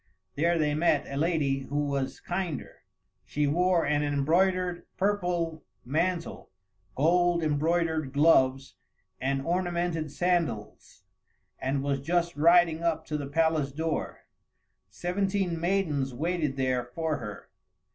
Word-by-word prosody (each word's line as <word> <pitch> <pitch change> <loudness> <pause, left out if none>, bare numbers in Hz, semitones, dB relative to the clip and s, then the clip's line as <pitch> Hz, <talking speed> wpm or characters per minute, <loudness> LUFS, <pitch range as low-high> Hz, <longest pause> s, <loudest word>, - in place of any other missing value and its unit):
There 170 +3 +1
they 150 -2 +1
met 155 -1 +2
a 140 - -6
lady 145 -3 +1
who 145 +2 -2
was 140 -2 -2
kinder. 175 -5 -4 0.5
She 150 0 -1
wore 175 +3 +2
an 145 +1 +1
embroidered 175 +5 +1
purple 175 -5 -1 0.2
mantle, 170 +6 -2 0.5
gold 175 +3 +3
embroidered 160 -1 0
gloves, 135 -3 +3 0.5
and 135 +1 -1
ornamented 175 -3 -1
sandals, 155 - -2 0.6
and 135 +1 -1
was 140 -1 -1
just 170 +3 0
riding 165 +1 +4
up 170 -1 0
to 150 - -3
the 140 - -4
palace 160 -1 +1
door. 160 +2 -3 0.7
Seventeen 180 - -1
maidens 155 -8 0
waited 155 -1 -1
there 130 -2 0
for 155 +6 -3
her. 105 -3 -8
160 Hz, 115 wpm, -28 LUFS, 140-175 Hz, 0.7 s, riding